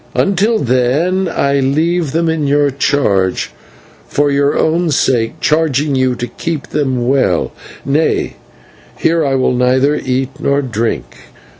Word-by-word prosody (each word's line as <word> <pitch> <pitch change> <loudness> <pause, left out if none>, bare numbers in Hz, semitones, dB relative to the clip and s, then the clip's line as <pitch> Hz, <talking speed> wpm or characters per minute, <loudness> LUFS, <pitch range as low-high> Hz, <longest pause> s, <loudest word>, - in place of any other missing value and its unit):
Until 200 +4 +2
then 140 - +1
I 140 0 0
leave 155 +4 0
them 165 +2 0
in 160 -3 0
your 145 0 +2
keeping, 125 -10 +1 0.7
for 145 - +1
your 140 +1 +1
own 170 +2 +1
sake 130 -1 0
charging 150 -2 +1
you 130 -1 +1
to 120 - -4
keep 150 +5 -5
them 130 -5 -1
well. 130 -10 +1 0.3
Nay, 145 +4 0 0.6
here 165 0 +1
I 135 -2 0
will 130 -1 +1
neither 130 +3 +2
eat 130 +2 -2
nor 140 0 0
drink. 115 -2 -4
140 Hz, 135 wpm, -15 LUFS, 130-155 Hz, 0.7 s, Until